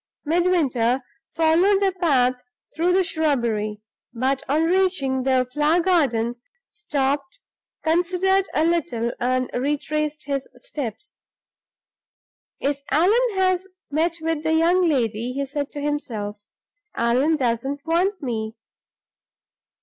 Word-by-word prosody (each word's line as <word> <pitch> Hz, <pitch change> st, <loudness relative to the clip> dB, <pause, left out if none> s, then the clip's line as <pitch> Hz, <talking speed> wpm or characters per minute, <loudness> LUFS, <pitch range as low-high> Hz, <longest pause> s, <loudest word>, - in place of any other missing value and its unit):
Midwinter 290 Hz, -8 st, +2 dB, 0.3 s
followed 335 Hz, +5 st, +4 dB
the 395 Hz, -1 st, +2 dB
path 255 Hz, -7 st, +3 dB, 0.4 s
through 340 Hz, +3 st, +1 dB
the 375 Hz, +1 st, +3 dB
shrubbery, 235 Hz, -, -1 dB, 0.3 s
but, 265 Hz, +3 st, 0 dB
on 305 Hz, +3 st, +2 dB
reaching 340 Hz, -7 st, +1 dB
the 255 Hz, -1 st, +2 dB
flower 300 Hz, +4 st, +3 dB
garden, 260 Hz, -10 st, +1 dB, 0.3 s
stopped, 280 Hz, -, -2 dB, 0.5 s
considered 360 Hz, +4 st, +2 dB
a 310 Hz, -, +3 dB
little, 250 Hz, -9 st, 0 dB
and 255 Hz, +1 st, +1 dB
retraced 295 Hz, +3 st, -2 dB
his 275 Hz, -2 st, -2 dB
steps. 295 Hz, -, -7 dB, 1.4 s
"If 280 Hz, 0 st, -1 dB
Allan 335 Hz, +9 st, +4 dB, 0.2 s
has 370 Hz, 0 st, +1 dB, 0.2 s
met 330 Hz, +3 st, 0 dB
with 325 Hz, -1 st, -1 dB
the 320 Hz, +1 st, +1 dB
young 345 Hz, +3 st, +3 dB
lady," 235 Hz, -3 st, 0 dB
he 280 Hz, +1 st, -2 dB
said 285 Hz, +1 st, -4 dB
to 290 Hz, -, -5 dB
himself, 215 Hz, -8 st, -4 dB, 0.5 s
"Allan 250 Hz, +7 st, +2 dB
doesn't 270 Hz, +2 st, -2 dB
want 355 Hz, +3 st, 0 dB
me." 220 Hz, -3 st, -3 dB
290 Hz, 110 wpm, -23 LUFS, 255-340 Hz, 1.4 s, followed